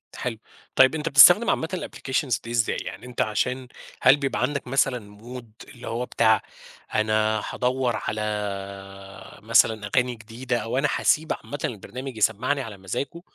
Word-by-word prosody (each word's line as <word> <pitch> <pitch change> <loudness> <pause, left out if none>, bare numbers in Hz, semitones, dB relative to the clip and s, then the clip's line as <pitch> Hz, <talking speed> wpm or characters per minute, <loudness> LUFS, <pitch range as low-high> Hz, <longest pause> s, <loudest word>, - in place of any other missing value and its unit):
حلو، 125 -4 -4 0.4
طيب 130 +4 +6
أنت 160 +1 -2
بتستخدم 180 +11 +8
عامةً 160 - 0
الapplications 130 -8 -2
دي 115 - -7
إزاي 120 -2 +1
يعني - - -7
أنت 125 0 -3
عشان 125 +3 -1 0.3
هل 135 +3 +6
بيبقى 140 -1 -2
عندك 140 -3 -1
مثلًا 125 -6 -1
mood 120 -2 -11
اللي 125 -2 -11
هو 120 +2 -2
بتاع 110 -3 +3 0.5
أنا 110 0 +1
هادوّر 125 -2 0
على 110 0 -2 1.2
مثلًا 110 -2 +3
أغاني 125 -1 +2
جديدة 120 +3 -4
أو 115 +2 -3
أنا 150 +2 +2
حاسيب 155 +3 +1
عامةً 145 - -8
البرنامج 125 +3 -6
يسمّعني 125 +7 +1
على 110 -5 -8
مزاجه 135 - -5
125 Hz, 150 wpm, -24 LUFS, 110-135 Hz, 1.2 s, بتستخدم